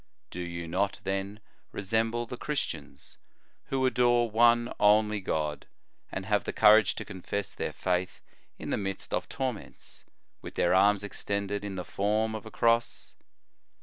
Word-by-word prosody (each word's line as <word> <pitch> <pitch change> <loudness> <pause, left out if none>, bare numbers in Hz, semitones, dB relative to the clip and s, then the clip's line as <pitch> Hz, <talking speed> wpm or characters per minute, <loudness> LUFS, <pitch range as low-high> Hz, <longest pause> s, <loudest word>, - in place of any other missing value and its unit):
Do 90 - -7
you 85 -1 -5
not, 95 +4 -1
then, 95 +2 -3 0.3
resemble 115 +4 0
the 120 - -6
Christians, 120 - -5 0.5
who 135 -1 0
adore 120 -2 +3
one 120 +1 +4
only 105 0 +4
God, 75 -5 -2 0.4
and 95 - -4
have 105 0 +1
the - - -2
courage 110 -1 +6
to - - -5
confess 100 +1 -4
their - - -3
C> - - -24
faith 90 +1 -1 0.4
in - - -6
the - - +1
midst 95 -1 -4
of - - -1
torments, 130 -5 -5 0.4
with - - -9
their 85 - +2
arms 100 +1 +4
extended 100 0 -3
in 100 -2 -4
the 90 - -4
form 110 +2 0
of 110 0 -6
a - - -9
Cross 115 0 +1
105 Hz, 155 wpm, -29 LUFS, 95-115 Hz, 0.5 s, courage